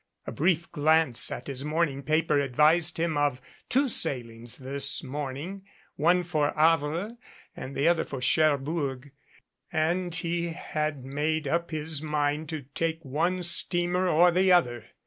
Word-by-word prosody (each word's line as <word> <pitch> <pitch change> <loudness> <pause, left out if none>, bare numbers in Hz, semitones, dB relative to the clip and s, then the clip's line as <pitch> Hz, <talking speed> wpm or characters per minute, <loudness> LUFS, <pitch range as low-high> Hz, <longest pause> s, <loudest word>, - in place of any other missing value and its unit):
A - - -5
brief 170 +1 0
glance 155 -4 +3
at 125 - -6
his 135 -1 -5
morning 150 -2 -1
paper 155 0 +1
advised 150 +5 +3
him 165 -2 -1
of 145 -3 0 0.3
two 275 +3 +2
sailings 120 - -2
this 140 +1 -4
morning, 145 +7 -6 0.3
one 175 +4 +2
for 155 -4 0
Havre 165 +7 +1 0.4
and 135 - -8
the 140 - +1
other 170 -1 +3
for 135 - -7
Cherbourg, 145 -1 0 0.6
and 170 +2 -1
he 170 0 -2
had 155 -4 -4
made 150 +2 -2
up 170 +4 -1
his 155 -1 -3
mind 150 0 -1
to 155 -3 -5
take 165 0 -2
one 170 +7 -1
steamer 175 +1 +3
or 175 +2 +5
the 185 +2 +3
other. 120 -11 +2
155 Hz, 145 wpm, -27 LUFS, 140-170 Hz, 0.6 s, or